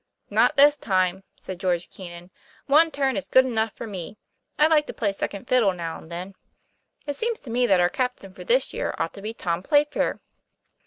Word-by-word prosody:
"Not - - +3
this 290 +1 +6
time," 190 -5 0 0.2
said 185 -2 -7
George 180 -2 0
Keenan. 175 -1 -10 0.3
'One 310 +4 +5
turn 275 -3 0
is 285 - -3
good 260 0 +6
enough 225 -3 0
for - - -7
me. 200 -1 -7 0.4
I 300 - +5
like 310 -2 +3
to - - -7
play 205 -4 0
second 200 +3 -5
fiddle 230 -7 +3
now 165 -2 -5
and 160 - -15
then. 180 +3 -6 0.7
It 285 -2 -3
seems 460 +7 -2
to 240 - -9
me 245 +1 +2
that 190 -4 +4
our 175 - +4
cap 250 +6 -2
tain 195 -1 -13
for - - -10
this - - +1
year - - -3
ought - - -2
to 200 - -10
be 220 +2 -5
Tom 170 -4 -2
Playfair. 290 +6 +1
220 Hz, 210 wpm, -24 LUFS, 185-280 Hz, 0.7 s, this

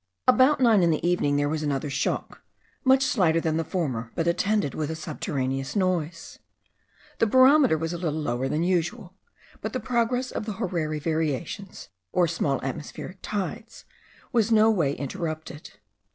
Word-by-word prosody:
About 260 +3 +5
nine 230 -6 +5
in 170 - +4
the 160 +1 0
evening 160 -5 +1
there 145 0 +1
was 155 +1 -2
another 145 -1 -2
shock, - - -2 0.4
much 265 0 +5
slighter 175 -10 +2
than 160 -1 0
the 165 - 0
former, 130 -10 -3
but 165 - 0
attended 190 0 +1
with 155 -1 -3
a 160 - -3
subterraneous 135 -4 -3
noise. 180 -4 -2 0.8
The 225 - +3
barometer 260 - +5
was 165 +2 -3
a 170 - -4
little 160 -3 -2
lower 130 -2 -1
than 155 +4 0
usual; 180 +3 -1 0.5
but 215 - -4
the 255 - -1
progress 250 +1 0
of 215 - -4
the 215 - -2
horary 165 -5 -2
variations 160 - -3 0.2
or 175 -1 +3
small 150 -4 0
atmospheric 145 +7 -6
tides, 215 +3 -5 0.5
was 230 -3 +2
no 220 0 +6
way 160 -10 +1
interrupted. 155 +1 -6
170 Hz, 160 wpm, -26 LUFS, 150-215 Hz, 0.8 s, no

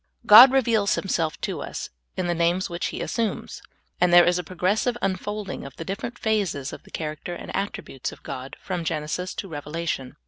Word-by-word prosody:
God 230 +5 +11
reveals 230 -6 +3
Himself 165 -5 -1
to - - -3
us - - -6 0.3
in 185 - 0
the 175 - +1
names 170 +2 +1
which 170 +1 -2
He - - -5
assumes, 230 -3 -3 0.4
and 180 0 +4
there 175 0 +8
is 175 0 +2
a - - -3
progressive 190 +8 0
unfolding 200 +1 -3
of 140 - -9
the 165 - -7
different 215 +6 -5
phases 195 -11 -1
of - - -8
the - - -19
character 155 +2 -5
and - - -7
attributes 195 -9 -4
of - - -14
God, 130 +1 -6
from 180 -3 -4
Genesis 160 +4 -3
to 195 - -5
Revelation. 150 -4 -4
180 Hz, 185 wpm, -25 LUFS, 165-205 Hz, 0.4 s, God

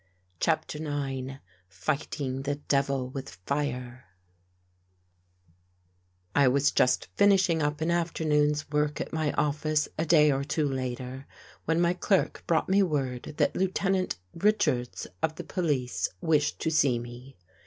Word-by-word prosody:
CHAPTER 155 -2 0
IX 135 -3 -3 0.4
FIGHTING 135 +5 -3
THE 145 +1 -1
DEVIL 140 -2 0
WITH 135 +1 -7
FIRE 130 -3 -3 2.3
I 140 -2 +5
WAS 140 +2 +3
just 125 0 +2
finishing 190 -5 +4
up 150 +1 -1
an 165 +2 +1
afternoon's 150 -3 +1
work 150 0 0
at - - -5
my 155 -2 0
office 150 +1 +1
a 160 - +1
day 150 -2 +6
or 135 0 0
two 150 +1 0
later, 130 0 -4 0.4
when 160 +1 +1
my 175 0 +3
clerk 190 +1 0
brought 165 -2 +2
me 195 +2 +4
word 140 -6 -2
that - - +2
Lieutenant 190 - 0 0.2
Richards 165 - +1 0.2
of 160 0 0
the - - -6
police 130 - -1
wished 150 - +1
to 160 - 0
see 140 -6 +3
me. 120 +3 -9
145 Hz, 130 wpm, -28 LUFS, 130-160 Hz, 2.3 s, day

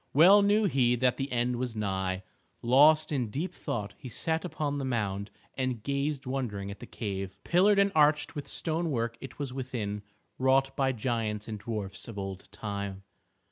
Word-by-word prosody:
Well 185 +7 +8
knew 205 +2 +4
he 125 -9 +3
that 125 +1 +2
the 135 0 -3
end 120 0 +1
was 125 -2 -3
nigh. 95 -2 -1 0.4
Lost 150 +6 +6
in 125 -6 0
deep 155 - -3
thought 105 -3 -4
he 130 - -8
sat 160 +7 -1
upon 150 -4 -2
the - - -2
mound 105 -5 -1 0.2
and 130 -4 -2
gazed 140 +1 -1
wondering 115 -7 -3
at 100 - -9
the - - -9
cave. 95 -3 -4
Pillared 195 +4 +4
and 200 0 +4
arched 150 -1 +4
with 145 -3 -6
stone 165 +1 -1
work 115 -4 -1
it 135 - -9
was 140 -4 -4
within, 115 -6 -3 0.4
wrought 135 +1 +3
by 135 -1 +2
giants 110 -3 -2
and 110 -2 -5
dwarfs 100 -3 -5
of 115 -3 -8
old 95 -1 -6
time. 100 -2 -5
125 Hz, 180 wpm, -29 LUFS, 105-145 Hz, 0.4 s, Well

